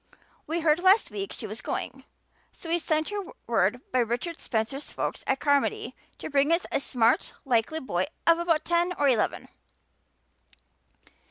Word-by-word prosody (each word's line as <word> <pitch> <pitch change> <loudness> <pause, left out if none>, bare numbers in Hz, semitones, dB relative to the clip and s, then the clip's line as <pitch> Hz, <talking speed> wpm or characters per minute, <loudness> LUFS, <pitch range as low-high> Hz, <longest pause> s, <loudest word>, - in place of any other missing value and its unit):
We 330 +2 -1
heard 310 0 +3
last 380 +4 +5
week 395 -1 -4
she - - -6
was - - -6
going, - - -4 0.5
so 330 - -10
we 340 +1 +2
sent 310 -1 0
her 410 0 -3 0.2
word 225 +1 +1
by 255 - +2
Richard 245 +8 -2
Spencer's 235 +5 -3
folks - - -3
at 270 - +1
Carmody 285 +1 +1 0.2
to - - -6
bring 285 +2 +3
us 335 +2 +2
a - - +2
smart, 240 -4 +1
likely 255 +5 +1
boy 185 - -1 0.2
of 335 0 +5
about 330 -2 +1
ten 345 +1 +1
or 290 -4 +1
eleven. 240 -5 +1
300 Hz, 160 wpm, -27 LUFS, 245-335 Hz, 0.5 s, last